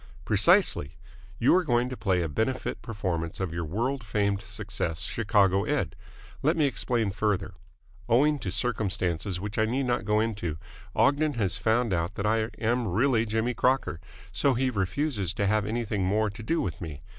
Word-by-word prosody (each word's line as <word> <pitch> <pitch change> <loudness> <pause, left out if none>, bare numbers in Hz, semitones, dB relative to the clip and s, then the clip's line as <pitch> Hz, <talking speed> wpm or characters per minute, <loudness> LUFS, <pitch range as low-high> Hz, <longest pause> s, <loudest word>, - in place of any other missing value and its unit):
"Precisely. 70 - +3 0.4
You 120 - +4
are 185 - +3
going 120 -5 +2
to 130 - -5
play 95 -6 +1
a - - -1
benefit 110 - -2
performance 90 -8 -3
of 95 -4 -2
your 85 0 -2
world 120 - -2
famed 100 -1 0
success, 100 -5 -4
Chicago 100 -4 +2
Ed. - - -1 0.5
Let 155 +4 +2
me 155 - +4
explain 120 -6 0
further. 100 -1 -1 0.6
Owing 145 +5 +4
to - - -4
circumstances 95 -6 -1
which 105 +3 -4
I 110 - +4
need 125 +5 0
not 120 -1 0
go 105 +1 +2
into, 105 -8 -2 0.4
Ogden 145 +1 +3
has 100 -6 0
found 115 -1 +1
out 85 +3 -1
that 100 - -3
I 110 +1 +1
am 120 +1 0
really 115 +4 +2
Jimmy 110 +3 0
Crocker, 125 -8 +1 0.3
so 140 -2 +2
he 130 +1 +1
refuses 100 - -1
to 100 - 0
have 105 0 +1
anything 110 -3 -1
more 105 +3 +1
to 110 +3 -10
do 165 +10 0
with 90 -2 -4
me. 80 -5 -7
110 Hz, 175 wpm, -27 LUFS, 95-120 Hz, 0.6 s, You